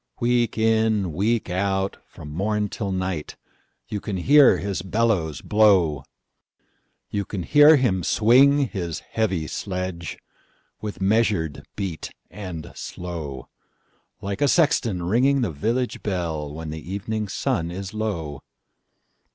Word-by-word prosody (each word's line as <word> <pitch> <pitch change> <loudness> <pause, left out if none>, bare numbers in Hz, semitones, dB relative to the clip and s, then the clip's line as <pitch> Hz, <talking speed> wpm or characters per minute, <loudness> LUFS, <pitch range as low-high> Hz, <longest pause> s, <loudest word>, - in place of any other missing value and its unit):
Week 120 -1 +1
in, 110 -5 +2
week 110 +7 0
out, 95 +1 -1
from 75 -2 -11
morn 105 +5 -1
till 100 -2 -4
night, 95 -4 -3 0.5
You 105 - -3
can 100 -3 -3
hear 140 +9 +6
his 100 -3 -3
bellows 95 - 0
blow; 95 -10 +3 1.1
You 100 - -1
can 95 -2 -5
hear 150 - +7
him 120 -10 +1
swing 135 - +4
his 85 -6 -4
heavy 95 -8 0
sledgeWith 90 -1 -4 0.8
measured 95 -7 +1
beat 95 -6 -4 0.2
and 90 -5 -7
slow, 80 -7 -6 0.7
Like 100 0 -4
a 145 - +4
sexton 120 - +2
ringing 130 +9 +2
the 110 -8 0
village 115 - -2
bell, 80 -7 -3
When 80 +1 -6
the 80 +2 -7
evening 105 +2 -3
sun 85 -3 -1
is 95 +3 -6
low. 85 -10 -3
100 Hz, 120 wpm, -23 LUFS, 85-110 Hz, 1.1 s, hear